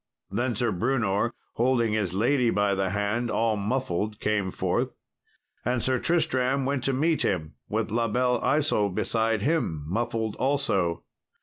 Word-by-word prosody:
Then 120 +4 0
Sir 120 +1 +1
Brewnor, 115 +1 0 0.2
holding 120 -2 +2
his 100 -5 -1
lady 120 +4 +2
by 100 -2 +2
the 95 -1 0
hand, 105 +5 -1
all 110 0 +1
muffled, 105 -2 -2
came 105 -3 0
forth, - - -1 0.7
and 125 -1 0
Sir 130 -1 +2
Tristram 140 -5 +1
went 135 -1 -1
to 135 - +2
meet 155 +4 +1
him 80 -5 -1 0.2
with 110 0 -1
La 115 +1 +1
Belle 125 +1 +1
Isault 105 -10 +1
beside 110 -2 0
him, 130 - 0
muffled 110 +3 -1
also. 130 - 0
115 Hz, 145 wpm, -26 LUFS, 100-130 Hz, 0.7 s, holding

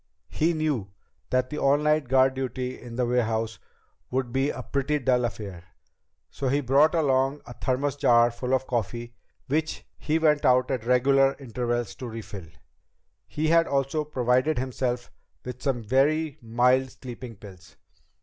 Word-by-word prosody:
He 165 +2 +1
knew 150 -10 -1 0.4
that 130 0 0
the 150 - -3
all 140 +1 +4
night 150 -1 +1
guard 130 +1 +4
duty 130 -1 -4
in 120 -1 -9
the 125 0 +1
warehouse 115 -2 0 0.5
would 125 -2 -2
be 135 +2 +1
a - - -5
pretty 140 +2 -1
dull 125 -3 +2
affair, 100 -6 -6 0.7
so 135 - -3
he 140 +3 +2
brought 145 +4 +3
along 135 -2 +1
a 120 - -9
thermos 135 +3 -1
jar 120 -3 +4
of 130 0 0
coffee 120 -1 -3 0.3
which 155 +3 -2
he 155 +1 0
went 150 -2 +3
out 125 0 +3
at 120 -3 -3
regular 135 +2 +4
intervals 120 -3 -3
to 125 - -7
refill. 105 -6 -8 0.8
He 155 +1 -1
had 165 0 +4
also 140 +2 0
provided 130 +1 +1
himself 125 -1 -2 0.3
with 125 0 -7
some 130 -5 -1
very 145 +6 +1
mild 125 +3 +2
sleeping 125 -2 -9
pills. 100 -2 -14
130 Hz, 150 wpm, -26 LUFS, 120-140 Hz, 0.8 s, all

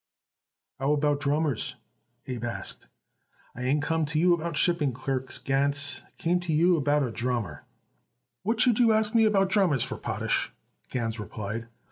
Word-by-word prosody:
"How 135 +2 +1
about 145 -1 +1
drummers?" 145 -2 0 0.5
Abe 125 -3 -5
asked. 120 - -4 0.7
"I 125 - -7
ain't 140 +4 +1
come 160 +1 0
to - - -8
ask 155 - -4
you 175 +3 +4
about 170 -2 -2
shipping 160 -7 +2
clerks, 130 +1 -2
Gans; 140 +1 +1
I - - -29
come 175 +2 +2
to 175 - -8
ask 150 - +2
you 175 +2 +4
about 145 -1 +2
a 125 - -2
drummer." 115 -3 -3 0.8
"What 225 +4 -1
should 245 -3 +4
you 230 -2 +5
ask 215 0 +1
me 225 -1 +5
about 195 -3 +3
drummers 180 - +3
for, - - -5
Potash?" - - -1 0.4
Gans 115 -2 -3
replied. 110 +2 -5
145 Hz, 170 wpm, -27 LUFS, 130-175 Hz, 0.8 s, you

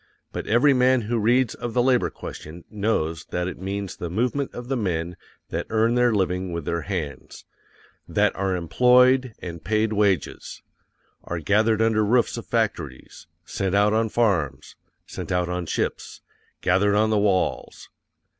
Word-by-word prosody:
But - - -5
every 120 +6 +4
man 130 0 +3
who 115 +2 -1
reads 120 +2 +2
of 120 -1 -6
the 120 - +3
labor 125 -1 +2
question 80 +3 -9
knows 100 -7 -1
that 90 0 -3
it 90 - -6
means 100 0 -4
the 85 - -5
movement 125 +9 -1
of 120 0 -8
the 135 - -1
men 90 -6 -2 0.3
that - - -3
earn 115 +1 +2
their 125 0 +3
living 95 -3 -1
with 85 -3 -4
their 85 0 -1
hands; 80 -9 -6 0.6
_THAT - - +2
ARE 95 -1 -1
EMPLOYED, 125 +7 +3
AND 85 -2 -7
PAID 110 +1 0
WAGES: 100 -6 -1 0.6
are 85 - -4
gathered 110 +6 +2
under 110 -1 +2
roofs 120 +3 +2
of 115 - -7
factories, 85 - -3 0.2
sent 95 +1 -2
out 105 +1 +3
on 110 0 +1
farms, 90 - 0 0.3
sent - - -7
out 90 -1 0
on 90 -1 -3
ships, - - -3 0.4
gathered 100 +3 +2
on 110 +1 +2
the 105 - +3
walls. 100 -3 -1
105 Hz, 160 wpm, -24 LUFS, 90-115 Hz, 0.6 s, every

